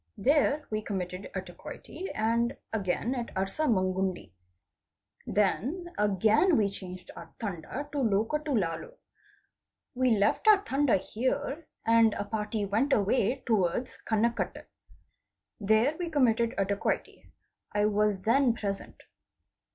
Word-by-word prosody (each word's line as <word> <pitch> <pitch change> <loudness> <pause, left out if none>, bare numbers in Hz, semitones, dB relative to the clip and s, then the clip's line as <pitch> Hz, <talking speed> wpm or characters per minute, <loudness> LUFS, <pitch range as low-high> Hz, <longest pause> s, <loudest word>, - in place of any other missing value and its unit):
There 290 +4 +2
we 215 0 -1
committed 185 -2 -4
a 190 - -1
dacoity, 190 - -9
and 230 +2 +1 0.2
again 215 +4 -1
at 240 -3 -4
Arsmangundi. 190 - 0 1.0
Then 280 - 0
again 215 - +3
we 205 -3 +2
changed 185 -2 -9
our - - -10
Tanda 210 - -5
to 290 - -2
Lokatolalu. 230 - 0 1.0
We 250 -3 +2
left 205 - +1
our 410 -2 +7
Tanda 275 - +2
here 275 - -2 0.2
and 230 -1 +5
a - - -2
party 210 0 -2
went 225 +8 +1
away 220 +5 +1
towards 220 +1 0
Kanakatte. 230 +2 -1 0.9
There 220 +8 +3
we 350 -1 -2
committed 235 -6 +2
a 195 - +2
dacoity. 200 +1 -3 0.4
I 205 0 +2
was 210 -2 +1
then 240 +3 +3
present. 200 -3 -5
220 Hz, 115 wpm, -29 LUFS, 200-265 Hz, 1.0 s, our